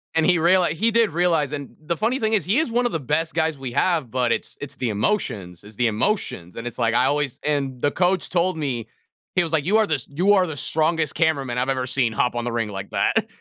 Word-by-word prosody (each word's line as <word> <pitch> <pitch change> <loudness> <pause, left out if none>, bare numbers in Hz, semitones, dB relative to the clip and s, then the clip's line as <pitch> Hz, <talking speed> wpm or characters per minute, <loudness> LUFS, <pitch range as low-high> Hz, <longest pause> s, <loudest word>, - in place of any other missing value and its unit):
and 160 -1 +3
he 180 0 +4
reali 175 +2 +4
he 210 +9 +1
did 230 -4 +3
realize, 165 -4 +1
and 145 -2 -6
the 160 +2 -4
funny 235 +5 0
thing 220 0 +1
is 215 - +2
he 200 +6 +2
is 310 -6 +1
one 245 +1 +1
of 240 - -1
the 165 - 0
best 150 +5 -1
guys 160 -2 +1
we 130 -3 -6
have, 160 -3 +1
but 125 -1 0
it's - - -3
it's 145 - -6
the 125 - -2
emotions, 100 - -2
it's 105 +1 -13
the 120 +2 +2
emotions. 105 - -2
And 115 - -7
it's 120 0 -6
like 115 -1 +2
I 125 +2 +3
always 145 -2 0
and 140 -4 -1
the 145 - +2
coach 185 0 +1
told 180 0 +1
me, 125 -7 -3 0.5
he 180 - +3
was 165 - -4
like, 155 -3 +1
"You 200 +5 +2
are 220 - +4
the 155 - 0
s 135 - -6
you 180 +8 +3
are 185 -3 +3
the 155 - -5
strongest 155 +1 0
cameraman 140 -7 0
I've 125 +1 0
ever 130 -1 -1
seen 125 -2 +1
hop 125 +3 +1
on 120 0 -3
the 120 - -2
ring 115 -2 -1
like 95 -1 -7
that," - - +1
150 Hz, 265 wpm, -23 LUFS, 125-180 Hz, 0.5 s, he